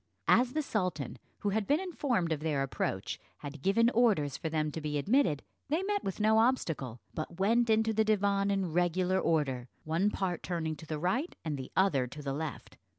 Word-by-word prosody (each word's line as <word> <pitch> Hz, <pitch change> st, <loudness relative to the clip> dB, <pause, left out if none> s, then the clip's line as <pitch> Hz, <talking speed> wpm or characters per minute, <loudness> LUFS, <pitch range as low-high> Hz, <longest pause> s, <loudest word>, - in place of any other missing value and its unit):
As 250 Hz, +1 st, +4 dB
the 310 Hz, -, 0 dB
sultan, 180 Hz, -, -2 dB, 0.2 s
who 205 Hz, -, +1 dB
had 205 Hz, 0 st, 0 dB
been 290 Hz, +3 st, +3 dB
informed 270 Hz, -, -1 dB
of 155 Hz, -, 0 dB
their 150 Hz, -3 st, 0 dB
approach, 135 Hz, -, -3 dB, 0.2 s
had 145 Hz, 0 st, -7 dB
given 230 Hz, -, +3 dB
orders 205 Hz, -, +3 dB
for 160 Hz, -, -3 dB
them 155 Hz, -1 st, 0 dB
to 160 Hz, -, -5 dB
be 150 Hz, -1 st, -2 dB
admitted, 175 Hz, -, +2 dB, 0.3 s
they 320 Hz, +6 st, +1 dB
met 405 Hz, +1 st, -1 dB
with 195 Hz, -, -4 dB
no 220 Hz, +1 st, +4 dB
obstacle, 160 Hz, -, 0 dB
but 160 Hz, +2 st, -5 dB
went 230 Hz, +4 st, +3 dB
into 220 Hz, 0 st, +3 dB
the 220 Hz, 0 st, +3 dB
divan 200 Hz, -2 st, +2 dB
in 195 Hz, -5 st, 0 dB
regular 180 Hz, +2 st, +2 dB
order, 135 Hz, -8 st, 0 dB, 0.2 s
one 165 Hz, +6 st, +1 dB
part 185 Hz, -4 st, -2 dB
turning 165 Hz, -3 st, -2 dB
to 160 Hz, -, -11 dB
the 155 Hz, -, -2 dB
right 230 Hz, -, -1 dB
and 155 Hz, -2 st, -1 dB
the 130 Hz, -2 st, -7 dB
other 145 Hz, -10 st, +3 dB
to 145 Hz, +4 st, -9 dB
the 135 Hz, -1 st, -2 dB
left. 155 Hz, 0 st, -5 dB
180 Hz, 200 wpm, -31 LUFS, 150-220 Hz, 0.3 s, As